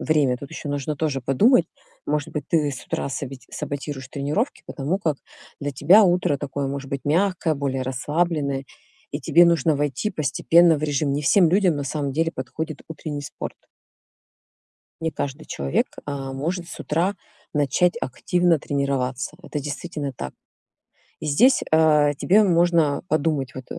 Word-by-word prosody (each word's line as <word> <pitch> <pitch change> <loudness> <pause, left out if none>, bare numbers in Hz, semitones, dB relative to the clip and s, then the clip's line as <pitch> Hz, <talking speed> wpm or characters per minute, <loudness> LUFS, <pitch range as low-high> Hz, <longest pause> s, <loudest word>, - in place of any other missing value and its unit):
время- 145 -5 +2
тут 140 +4 -10
ещё 155 -2 -6
нужно 145 +1 -2
тоже 145 -4 -1
подумать, 160 - +4 0.4
может 150 -1 -1
быть, 150 -3 -3
ты 150 -4 +2
с 130 - -8
утра - - -3
сабити 135 0 -6
саботируешь 145 -2 -5
тренировки, 150 - -2
потому 155 +7 -2
как 155 -7 0 0.4
для 145 0 -2
тебя 170 +11 +6
утро 175 -6 +2
такое, 140 0 -3
может 135 0 -5
быть, 140 -1 -3
мягкое, 170 +1 +1
более 135 -2 -2
расслабленное, 140 +1 -1 0.5
и - - -3
тебе 175 +1 +5
нужно 165 -2 +3
войти 145 - -1
постепенно 165 +2 +4
в 150 - -6
режим. 145 -1 0
Не 145 +1 -1
всем 175 +3 +5
людям 185 -3 +3
на 145 - -3
самом 140 0 -2
деле 165 +3 0
подходит 155 +4 -5
утренний 150 -2 -5
спорт. - - -6 1.5
Не 160 0 -1
каждый 140 +3 -4
человек, 70 0 -1 0.2
а, 135 -2 -4
может 170 +5 -3
с - - -9
утра 175 +6 0 0.4
начать 150 - +2
активно 175 -8 +1
тренироваться. 140 -2 -2
Это 150 - -4
действительно 145 0 -5
так. 65 - -6 0.9
И - - -4
здесь, 195 - +4
а, 150 -2 +5
тебе 200 +9 +4
можно 170 -5 +3
подумать 150 -4 0
вот 130 - -7
150 Hz, 155 wpm, -23 LUFS, 140-165 Hz, 1.5 s, тебя